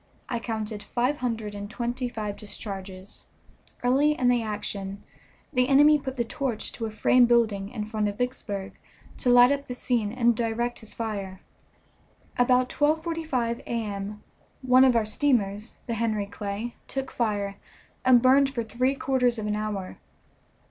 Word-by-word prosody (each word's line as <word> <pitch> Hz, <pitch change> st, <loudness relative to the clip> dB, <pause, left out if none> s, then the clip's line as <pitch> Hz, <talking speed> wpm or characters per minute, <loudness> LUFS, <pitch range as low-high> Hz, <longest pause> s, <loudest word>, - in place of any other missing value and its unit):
I 235 Hz, -, -1 dB
counted 220 Hz, -2 st, -4 dB
five 250 Hz, +7 st, -1 dB
hundred 225 Hz, -5 st, -3 dB
and 205 Hz, 0 st, -6 dB
twenty 240 Hz, +2 st, -3 dB
five 215 Hz, -4 st, -4 dB
discharges. 195 Hz, -2 st, -8 dB, 0.6 s
Early 275 Hz, +5 st, +4 dB
in 250 Hz, -, +3 dB
the 245 Hz, -1 st, +3 dB
action 205 Hz, -2 st, -4 dB, 0.5 s
the 250 Hz, -1 st, +3 dB
enemy 295 Hz, +2 st, +6 dB
put 265 Hz, -1 st, -6 dB
the 235 Hz, -, +2 dB
torch 240 Hz, -2 st, -3 dB
to 225 Hz, -, -4 dB
a -, -, -5 dB
frame 240 Hz, +3 st, +4 dB
building 220 Hz, -5 st, +2 dB
in 215 Hz, -2 st, -4 dB
front 215 Hz, -1 st, -1 dB
of 205 Hz, 0 st, -4 dB
Vicksburg 205 Hz, -6 st, -3 dB, 0.4 s
to 250 Hz, -, 0 dB
light 245 Hz, +1 st, +7 dB
up 280 Hz, 0 st, -1 dB
the 250 Hz, -, -5 dB
scene 235 Hz, -5 st, 0 dB
and 235 Hz, -1 st, +2 dB
direct 235 Hz, +1 st, -1 dB
his 220 Hz, -, -5 dB
fire. 200 Hz, -4 st, -4 dB, 1.0 s
About 250 Hz, +1 st, +3 dB
12.45 305 Hz, -6 st, 0 dB
A.M. 210 Hz, -2 st, -4 dB, 0.4 s
one 255 Hz, 0 st, +6 dB
our 225 Hz, -2 st, +3 dB
steamers, 215 Hz, -3 st, 0 dB
the 235 Hz, -, -3 dB
Henry 220 Hz, -2 st, 0 dB
Clay, 205 Hz, +3 st, -5 dB
took 270 Hz, -1 st, -4 dB
fire, 205 Hz, -4 st, -1 dB, 0.5 s
and 250 Hz, -2 st, +6 dB
burned 270 Hz, +2 st, +5 dB
for 250 Hz, -4 st, -3 dB
three 255 Hz, +4 st, 0 dB
quarters 255 Hz, -3 st, +1 dB
of 215 Hz, -, -3 dB
an 210 Hz, 0 st, 0 dB
hour. 210 Hz, -3 st, -4 dB
235 Hz, 155 wpm, -26 LUFS, 210-255 Hz, 1.0 s, light